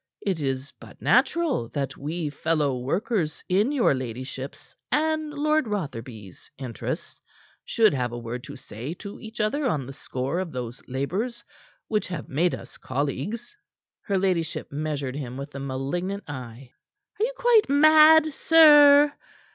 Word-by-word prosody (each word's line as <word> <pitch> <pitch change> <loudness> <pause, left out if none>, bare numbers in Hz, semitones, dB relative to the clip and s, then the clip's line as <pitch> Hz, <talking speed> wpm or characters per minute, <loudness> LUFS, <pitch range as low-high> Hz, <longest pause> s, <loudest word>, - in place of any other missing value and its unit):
It 190 -5 0
is 135 0 -3
but - - -14
natural 325 - +2
that 135 -2 -2
we 155 +1 -4
fellow 150 -2 0
workers 170 - -1
in 205 +8 +2
your 265 - +3
ladyship's 130 +1 -7 0.2
and 310 0 +1
Lord 305 -1 +1
Rotherby's 120 - -6
interests, 125 -5 -6 0.4
should 220 -3 +3
have 125 -3 -1
a 120 - -5
word 120 +1 -6
to - - -9
say 125 +10 -7
to 200 +2 -9
each 225 +1 -10
other 260 +7 0
on 145 - -1
the 135 - -8
score 130 +5 -3
of 185 -3 -4
those 125 -2 -6
labors 185 - -3 0.4
which 215 -1 -1
have 175 -5 -6
made 165 +6 +1
us - - -13
colleagues." 145 - -3 0.5
Her 200 -3 -1
ladyship 185 -4 -1
measured 145 -3 -3
him 130 -3 -5
with 140 +2 -7
a 140 - -6
malignant 140 +9 -3
eye. 125 -2 -8 0.5
"Are - - +1
you - - 0
quite 470 - +4
mad, 310 +1 +7
sir?" 295 -2 +7
160 Hz, 145 wpm, -25 LUFS, -, 0.5 s, mad